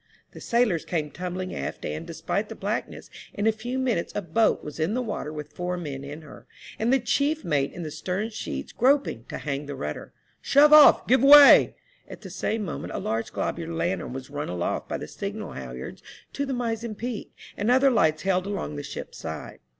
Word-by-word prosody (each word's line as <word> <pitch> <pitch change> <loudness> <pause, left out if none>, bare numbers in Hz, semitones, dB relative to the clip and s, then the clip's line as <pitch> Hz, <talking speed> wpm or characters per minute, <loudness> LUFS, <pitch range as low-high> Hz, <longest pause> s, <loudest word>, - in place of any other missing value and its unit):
The - - -12
sailors 235 -9 +1
came 155 -4 -2
tumbling 185 +1 -5
aft, 70 - -5
and, 75 +1 -5
despite - - -3
the - - -7
black - - -2
ness, - - -12 0.2
in 205 - -2
a 225 - +5
few 240 +4 -5
minutes 245 -9 -1
a 205 - -1
boat 195 +7 +2
was 150 +1 -8
in 165 +8 0
the 255 - 0
water 210 -9 -4
with 150 -1 -8
four 180 0 -3
men 140 -5 -6
in 145 +3 -8
her, 150 - -14 0.3
and 225 +3 +1
the 270 - +5
chief 285 +6 0
mate 145 -4 0
in 175 - -7
the 155 - -5
stern 195 +8 -3
sheets 220 - -6
grop 275 +3 +3
ing 115 0 -7
to - - -6
hang 145 0 -4
the 145 - -5
rudder. 75 - -6 0.3
Shove 295 +2 +5
off— 300 -2 +8
give 255 0 +4
way 285 0 +9 0.3
1 - - -9
At - - -12
the - - -9
same 220 -1 -2
moment 165 - -5
a - - -2
large 115 +1 -2
globular 165 0 -3
lantern 175 -1 -2
was 130 +1 -8
run 145 0 -4
aloft 90 -1 -3
by - - -2
the - - -7
signal - - -6
halliards 65 -1 -8 0.3
to 280 0 -2
the - - -3
mizen 230 -2 -3
peak, 235 +1 -5 0.2
and 205 +3 -1
other 260 +2 +5
lights 160 -9 +2
held 190 0 +1
along 195 -7 -4
the - - -3
ship's 145 - -8
side. - - -7
185 Hz, 215 wpm, -26 LUFS, 150-235 Hz, 0.3 s, way